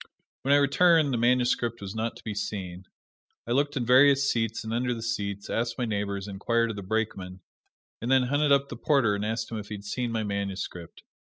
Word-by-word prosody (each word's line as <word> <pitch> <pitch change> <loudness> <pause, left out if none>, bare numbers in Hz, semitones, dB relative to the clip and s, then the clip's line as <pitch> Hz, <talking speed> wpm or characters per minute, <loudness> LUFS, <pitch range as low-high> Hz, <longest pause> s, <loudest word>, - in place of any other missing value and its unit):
When 135 - 0
I 145 - +7
returned 150 +1 +4
the 120 - 0
manuscript 120 -1 +1
was 100 -1 -6
not 110 +1 -3
to - - -14
be 110 - -4
seen. 95 -3 -5 0.6
I 120 - -5
looked 145 +3 +1
in 120 - -1
various 135 +2 +5
seats, 115 -3 -1
and 110 0 -4
under 125 +1 0
the 115 - -6
seats, 100 -4 -3
asked 115 0 -2
my 125 - -1
neighbors, 100 -2 -3
inquired 115 +4 0
of - - -7
the 100 - -6
brakeman, 95 -3 -3 0.6
and 115 - -3
then 130 -1 +5
hunted 145 +3 +1
up 140 0 +3
the 120 - -7
porter 130 -5 +2
and 100 0 -2
asked 110 +1 -3
him 110 - -3
if 105 - -9
he 105 - -4
had 100 0 -11
seen 120 +3 -2
my 110 -1 -1
manuscript. 100 -4 -5
115 Hz, 220 wpm, -27 LUFS, 100-125 Hz, 0.6 s, I